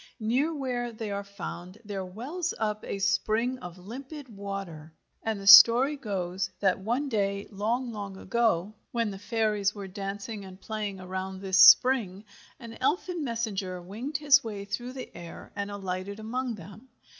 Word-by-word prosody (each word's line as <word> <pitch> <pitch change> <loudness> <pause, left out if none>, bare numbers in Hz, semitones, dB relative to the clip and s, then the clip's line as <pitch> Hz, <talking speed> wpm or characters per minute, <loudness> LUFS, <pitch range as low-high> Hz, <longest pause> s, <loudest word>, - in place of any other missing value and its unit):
Near 250 +8 +1
where 250 -4 -2
they 220 -2 -5
are 200 0 -3
found 195 -1 -8
there 200 -2 -4
wells 270 - -4
up 215 -1 -2
a - - -4
spring 225 +5 +1
of 180 -3 -9
limpid 260 - -9
water, 195 -6 -7 0.3
and 220 -2 -2
the 195 - -8
story 235 +8 +9
goes 190 -7 -3
that 195 -2 +2
one 240 +9 -1
day, 200 -4 -1
long, 230 +5 -1
long 200 -3 -6
ago, 215 -3 0 0.2
when 230 -3 0
the 195 - -8
fairies 210 -1 0
were 200 -2 -6
dancing 200 +2 -5
and 190 -1 -11
playing 210 -2 -4
around 190 +1 -5
this 190 -1 +1
spring, 200 0 +7 0.3
an 230 -2 -10
elfin 345 +4 0
messenger 210 -7 -3
winged 225 - -5
his 280 -1 +5
way 205 -3 -5
through 240 +5 -4
the 260 -1 -8
air 170 -1 -10
and 200 0 -3
alighted 195 0 -5
among 240 +2 -3
them. 205 +7 -13
210 Hz, 160 wpm, -28 LUFS, 195-240 Hz, 0.3 s, story